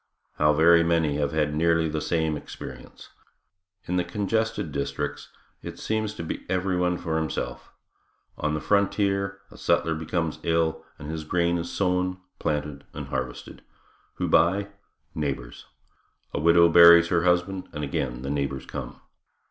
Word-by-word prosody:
How 75 0 +5
very 85 +2 +6
many 80 -3 +1
have 70 -1 0
had 75 -1 0
nearly 80 +1 +2
the 75 0 -2
same 80 -2 0
experience. 75 - -10 0.8
In 90 - -1
the 90 - +2
congested 105 0 -1
districts 70 +1 -4 0.3
it - - -8
seems 110 -1 -2
to 85 - -5
be 80 - -5
everyone 90 -1 0
for 80 -2 -2
himself. 80 - -4 0.6
On 75 0 -1
the 75 - -3
frontier 100 -1 +1
a - - -13
settler 80 +1 +1
becomes 80 0 -2
ill, 80 -1 0
and 75 +2 -7
his 80 -1 -4
grain 85 +2 +1
is 85 +1 -5
sown, 90 -1 0 0.2
planted 75 -1 -2
and - - -6
harvested. 65 -1 -5 0.5
Who - - -2
by? 100 +4 +3 0.4
Neighbors. 65 -5 -4 0.7
A - - -1
widow 85 +2 +6
buries 85 0 +8
her 85 -1 +2
husband 90 +1 +1
and 75 -1 -5
again 65 -3 -3
the 70 - -3
neighbors 70 -2 -2
come. - - -7
85 Hz, 150 wpm, -25 LUFS, 75-90 Hz, 0.8 s, buries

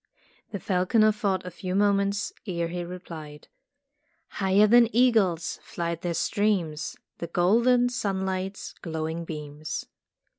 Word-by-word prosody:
'' - - -35
The 205 - -3
falconer 210 +4 +3
thought 200 -3 -1
a 180 - -6
few 180 +2 -4
moments 200 0 +1
ere 170 -3 -1
he 175 0 -3
replied: 160 -4 -9 0.8
"Higher 195 +1 +3
than 235 +1 +6
eagle's 205 -10 +3
flight 170 -1 -4
there 175 -1 -2
streams 190 -9 0 0.2
The 170 - -4
golden 235 +9 +3
sunlight's 190 -4 -3
glowing 160 0 -3
beams." 150 -1 -5
185 Hz, 120 wpm, -26 LUFS, 170-205 Hz, 0.8 s, than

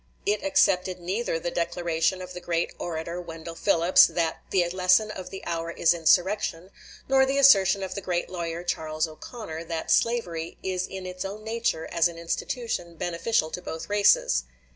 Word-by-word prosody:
It 210 +1 +1
accepted 190 -11 +2
neither 185 +2 -2
the 170 +1 -4
declaration 170 +1 -1
of 180 0 -9
the 180 - -6
great 170 -1 -1
orator 170 +1 -4
Wendell 165 -1 -8
Phillips, 170 +2 +5
that 165 -2 -2
"the 180 -3 +2
lesson 185 +4 +3
of 185 -3 -7
the 190 - -9
hour 165 -1 -3
is 170 0 +3
insurrection," 180 +2 +1 0.4
nor 270 0 +4
the 270 +1 0
assertion 195 -8 +6
of 185 -1 -4
the 200 - -5
great 175 -2 -2
lawyer 170 -1 -4
Charles 155 -2 -1
O'Conor, 160 +1 -8
that 165 -1 -3
slavery 175 -9 0
"is 185 -1 -2
in 190 -1 -7
its 180 0 -5
own 200 +2 -6
nature, 225 -7 -1
as 170 0 +2
an 170 -1 -9
institution, 170 +1 -3
beneficial 170 0 -1
to 180 - -5
both 160 0 -7
races." 200 - +3
180 Hz, 170 wpm, -26 LUFS, 165-195 Hz, 0.4 s, assertion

